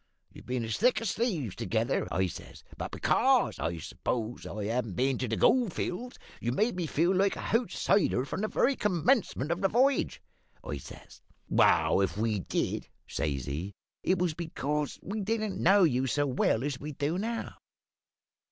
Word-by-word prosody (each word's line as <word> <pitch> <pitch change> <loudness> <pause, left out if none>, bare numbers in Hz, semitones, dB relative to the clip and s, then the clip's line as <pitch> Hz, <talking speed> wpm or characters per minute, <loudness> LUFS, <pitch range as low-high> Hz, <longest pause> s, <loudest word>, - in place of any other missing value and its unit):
You've - - -13
been 125 -2 -1
as 110 - -2
thick 245 +4 +4
as 230 -4 -1
thieves 170 - -1
together,' - - 0
I 95 +2 +2
says; 90 - -8
`but - - -4
because, - - +2
I 85 +1 -2
s'pose, 115 +8 -4
I 105 +1 -5
haven't 115 -3 -1
been 130 0 +1
to 130 - -1
the 110 - -1
gold 240 -8 +3
fields 245 +8 -4 0.2
you've 120 +2 -1
made 220 - +1
me 175 -3 -2
feel 170 +5 +2
like 195 +1 +2
a - - -8
houtsider, 205 - +1
from 185 - -4
the 215 - 0
very 275 +5 +2
commencement 190 - +1
of 170 +2 -1
the 195 - +3
v'yage,' 260 +5 +2 0.5
I 70 - -4
says. - - -13 0.3
"`Well, 100 - +4
if 95 -1 -2
we 110 -1 0
did,' - - -2 0.2
says 70 -5 -2
he, 85 +8 -4 0.3
`it 185 - +2
was 175 -2 +1
because 150 -3 -3
we 210 +3 -3
didn't 215 0 -2
know 195 +2 +6
you 135 -5 +2
so 145 +4 +1
well 125 -3 +1
as 140 -2 -2
we 150 +1 -6
do 145 +6 -1
now.' 230 +2 -3
150 Hz, 180 wpm, -29 LUFS, -, 0.5 s, know